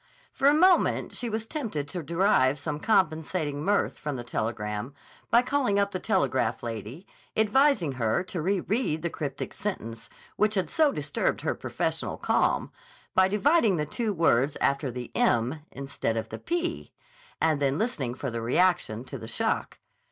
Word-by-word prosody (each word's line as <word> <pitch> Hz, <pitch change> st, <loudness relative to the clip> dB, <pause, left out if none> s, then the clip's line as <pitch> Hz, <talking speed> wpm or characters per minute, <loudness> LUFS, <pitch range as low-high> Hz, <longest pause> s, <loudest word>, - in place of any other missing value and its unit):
For 275 Hz, -, +2 dB
a 285 Hz, -, +7 dB
moment 365 Hz, +3 st, +3 dB
she 245 Hz, -, -3 dB
was 220 Hz, 0 st, -3 dB
tempted 220 Hz, -, -4 dB
to 175 Hz, +3 st, -4 dB
derive 150 Hz, -4 st, +2 dB
some 145 Hz, +1 st, -4 dB
compensating 155 Hz, -6 st, 0 dB
mirth 205 Hz, +3 st, +1 dB
from 150 Hz, -2 st, -3 dB
the 120 Hz, -, -5 dB
telegram 110 Hz, +1 st, -3 dB, 0.3 s
by 235 Hz, +1 st, +5 dB
calling 255 Hz, -6 st, +1 dB
up 200 Hz, 0 st, +2 dB
the 185 Hz, -, -3 dB
telegraph 120 Hz, -7 st, 0 dB
lady, 115 Hz, -, -6 dB, 0.3 s
advising 220 Hz, -, +3 dB
her 125 Hz, +5 st, 0 dB
to 180 Hz, -2 st, -4 dB
re 190 Hz, +3 st, +1 dB
read 190 Hz, -7 st, -1 dB
the 170 Hz, -, -1 dB
cryptic 145 Hz, -3 st, -5 dB
sentence 115 Hz, -, -5 dB, 0.3 s
which 215 Hz, +1 st, +2 dB
had 190 Hz, -, -1 dB
so 310 Hz, -3 st, +4 dB
disturbed 145 Hz, -, -1 dB
her -, -, 0 dB
professional -, -, -2 dB
calm, -, -, +1 dB, 0.4 s
by 185 Hz, 0 st, +5 dB
dividing 220 Hz, -, +3 dB
the 150 Hz, -, 0 dB
two 220 Hz, -, -2 dB
words 150 Hz, -6 st, +2 dB
after 140 Hz, 0 st, +1 dB
the 125 Hz, 0 st, -6 dB
m 120 Hz, +6 st, +2 dB
instead 135 Hz, -4 st, -3 dB
of 110 Hz, 0 st, -3 dB
the -, -, -6 dB
p—and 335 Hz, -, -3 dB
then 140 Hz, 0 st, +2 dB
listening 150 Hz, -, -1 dB
for 135 Hz, -1 st, -4 dB
the 115 Hz, 0 st, -3 dB
reaction 120 Hz, -3 st, +1 dB
to -, -, -8 dB
the 110 Hz, -, -8 dB
shock. 110 Hz, -, -1 dB
160 Hz, 165 wpm, -27 LUFS, 130-210 Hz, 0.4 s, a